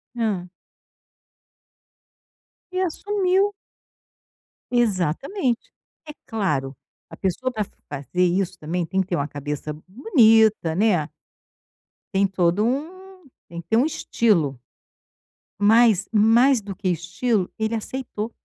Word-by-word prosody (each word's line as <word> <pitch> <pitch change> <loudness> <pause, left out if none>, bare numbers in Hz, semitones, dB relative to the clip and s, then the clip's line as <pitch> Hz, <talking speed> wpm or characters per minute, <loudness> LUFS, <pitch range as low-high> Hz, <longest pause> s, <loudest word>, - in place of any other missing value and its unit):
Hã. 210 -7 -1 2.3
E 370 - -2
assumiu. 385 +2 +1 1.2
Exatamente. 240 - 0 0.3
É 300 - -8
claro, 150 - -2 0.3
a - - -10
pessoa 200 +7 -2
para 215 -3 -2 0.3
fazer 145 +5 -2
isso 185 +1 0
também, 170 +3 -2
tem 190 +3 0
que 185 - -4
ter 180 - -1
uma 145 -2 -1
cabeça 145 +1 -5
bonita, 220 - +4
né. 180 -6 +2 1.0
Tem 195 +1 +3
todo 185 +2 +1
um 290 +9 -2 0.5
tem 170 0 -7
que - - -29
ter 225 - +3
um 260 - +4
estilo. 200 - +1 1.0
Mas, 215 -1 +4
mais 230 +4 +5
do 200 -1 -7
que 185 - -2
estilo, 180 +4 -1
ele 220 +1 -1
aceitou. 225 -1 -5
210 Hz, 110 wpm, -23 LUFS, 175-240 Hz, 2.3 s, mais